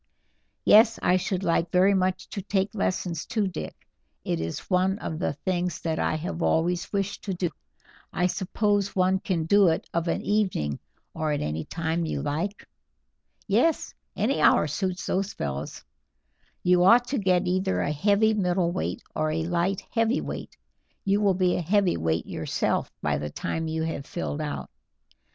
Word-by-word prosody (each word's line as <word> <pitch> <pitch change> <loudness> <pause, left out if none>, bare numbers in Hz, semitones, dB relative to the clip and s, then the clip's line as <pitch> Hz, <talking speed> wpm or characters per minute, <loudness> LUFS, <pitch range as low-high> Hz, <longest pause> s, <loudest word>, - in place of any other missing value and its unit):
"Yes, 225 +1 +7
I 180 - +4
should 185 0 -2
like 170 -1 +1
very 185 +2 +5
much 185 -1 0
to 200 - -5
take 195 +1 -1
lessons 180 -5 -1
too, 215 -4 -1
Dick; 180 -4 -7 0.4
it 85 - -1
is 80 0 -4
one 190 +1 +2
of 160 -7 -5
the 145 - 0
things 175 +2 -2
that 160 -1 -1
I - - +1
have 165 +2 -4
always 175 +2 +1
wished 200 -1 -2
to 195 -3 -2
do. 175 -1 -1 0.6
I 180 - 0
suppose 200 +2 0
one 185 0 +3
can 175 -5 -1
do 200 +3 +5
it 160 - 0
of 170 0 0
an 165 - -1
evening, 185 - 0 0.3
or 155 -1 -1
any 80 - -2
time 165 0 -2
you 140 - -3
like?" 165 +8 -3 0.8
"Yes, 240 +11 +1 0.2
any 260 +6 0
hour - - +5
suits 180 +5 -2
those 195 +1 -1
fellows. 70 0 -5 0.8
You 180 0 +4
ought 235 +6 +6
to 275 - 0
get 185 -2 +2
either 185 +2 0
a - - 0
heavy 205 +7 +3
middleweight 180 -3 0
or 155 - 0
a 160 +1 -1
light 175 +3 0
heavyweight; 230 +2 -1 0.5
you 200 +1 +2
will 200 -3 +3
be 180 -1 +2
a - - -1
heavyweight 155 - +1
yourself - - -1
by - - +1
the 75 - -4
time 160 - -3
you 160 0 -2
have 155 -3 -4
filled 155 -3 -3
out. 150 - -4
180 Hz, 165 wpm, -26 LUFS, 160-195 Hz, 0.8 s, Yes